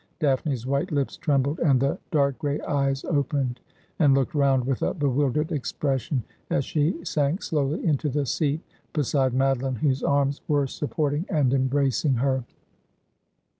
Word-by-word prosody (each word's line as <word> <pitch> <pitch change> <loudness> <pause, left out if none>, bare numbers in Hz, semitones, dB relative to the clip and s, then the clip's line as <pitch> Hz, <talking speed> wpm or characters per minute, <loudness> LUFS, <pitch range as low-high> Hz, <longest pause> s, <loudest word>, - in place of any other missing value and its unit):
Daphne's 135 -5 0
white 140 +7 -1
lips 140 -3 -1
trembled, 145 -1 0
and 135 -5 +3
the 135 +2 0
dark 140 -3 +1
gray 145 -1 -1
eyes 140 -1 -1
opened 140 -5 0 0.4
and 145 -5 +5
looked 135 -2 0
round 135 -4 +2
with 135 -1 -1
a - - 0
bewildered 145 +1 0
expression, 135 -2 -1 0.3
as 140 - +1
she 165 +3 0
sank 150 +2 0
slowly 150 0 -1
into 150 -2 +1
the 145 +1 0
seat 150 +4 0 0.3
beside 140 -3 +1
Madoline, 135 -1 +1
whose 135 0 +1
arms 140 0 +1
were 145 -2 +2
supporting 145 +4 -2
and 145 -7 +2
embracing 135 0 +1
her. 130 +1 +1
140 Hz, 145 wpm, -25 LUFS, 135-150 Hz, 0.4 s, and